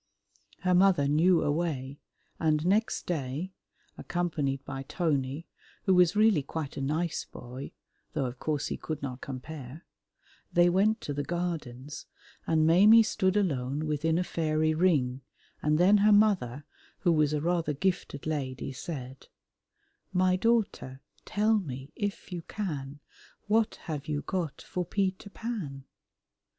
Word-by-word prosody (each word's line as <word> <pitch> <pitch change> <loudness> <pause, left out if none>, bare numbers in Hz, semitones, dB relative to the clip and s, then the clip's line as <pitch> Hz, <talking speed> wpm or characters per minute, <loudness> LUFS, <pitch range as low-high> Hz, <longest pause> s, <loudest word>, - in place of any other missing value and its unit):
Her 180 0 +2
mother 180 -6 +4
knew 165 +4 +4
a 145 - +1
way, 145 -4 -2 0.4
and 155 -1 +1
next 210 +5 +1
day, 155 +3 -3 0.5
accompanied 150 -6 -2
by 135 -1 -5
Tony 140 -1 -1 0.4
(who 190 - +3
was 180 0 +5
really 215 -6 +4
quite 145 +1 -5
a - - -4
nice 155 +4 -1
boy, 125 +3 -9 0.4
though 135 - 0
of 125 0 -5
course 150 -3 -1
he - - -3
could 155 -3 -5
not 130 -2 -5
compare), 140 +2 -8 0.7
they 175 0 +5
went 210 +5 +2
to 145 - -4
the 145 - -2
Gardens, 150 -5 -4 0.4
and 160 -1 +3
Maimie 205 +8 +7
stood 190 -2 +1
alone 145 -6 0
within 155 +2 0
a 180 - +1
fairy 155 -2 0
ring, 145 -7 +2 0.4
and 150 0 +2
then 190 +5 +6
her 210 +1 +5
mother, 185 - +3 0.4
who 175 - +3
was 155 -3 +3
a 150 - 0
rather 165 -1 0
gifted 145 -3 -2
lady, 135 -4 -3
said, 130 -2 -7 0.8
"My 185 0 +3
daughter, 195 - 0 0.2
tell 215 +1 +2
me, 135 -5 -7
if 205 -1 -4
you 175 -1 -4
can, 145 -8 -5 0.4
What 220 +1 +2
have 150 -3 -5
you 150 -1 -2
got 175 -6 -3
for 180 -2 -3
Peter 190 +2 -2
Pan?" 195 - -5
160 Hz, 140 wpm, -29 LUFS, 140-185 Hz, 0.8 s, Maimie